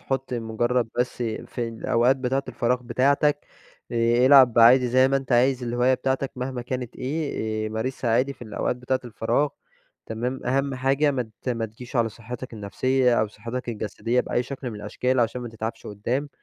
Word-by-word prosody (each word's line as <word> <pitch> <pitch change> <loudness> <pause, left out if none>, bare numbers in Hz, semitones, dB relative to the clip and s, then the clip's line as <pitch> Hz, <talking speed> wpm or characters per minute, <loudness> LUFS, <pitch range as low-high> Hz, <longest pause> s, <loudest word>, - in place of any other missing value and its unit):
حط 135 -1 -3
مجرد 120 +1 0
بس 125 0 0
في 115 +1 -3
الأوقات 115 +3 +2
بتاعة 135 +1 -1
الفراغ 125 +1 0
بتاعتك، 140 +4 +1 0.5
آآ، 120 +1 +3
العب 130 -4 +7
عادي 125 +2 +7
زي 130 +2 +4
ما 135 - +2
أنت 135 -1 -3
عايز 125 +1 +3
الهواية 120 +2 +2
بتاعتك 130 +1 -1
مهما 125 -1 -4
كانت 125 -1 -5
إيه، 125 -6 -2
آآ - - -2
مارسها 115 +2 -2
عادي 130 +4 +2
في 135 - -14
الأوقات 110 +2 -2
بتاعة 125 +1 -1
الفراغ 120 +5 0 0.6
تمام، 120 +4 -3
أهم 135 +1 +1
حاجة 135 +3 +2
ما 125 -5 -3
ت - - -4
ما 115 -2 -1
تجيش 120 +4 -9
على 115 -1 +3
صحتك 120 +3 -8
النفسية، 125 +4 +1
أو 110 - 0
صحتك 120 +4 -6
الجسدية، 115 +2 -1
بأي 120 - -1
شكل 130 0 -6
من 110 - -7
الأشكال، 125 +5 -1
عشان 120 +2 0
ما 120 - -5
تتعبش 115 +1 -6
قدَّام، 120 +8 -2
125 Hz, 175 wpm, -25 LUFS, 115-130 Hz, 0.6 s, العب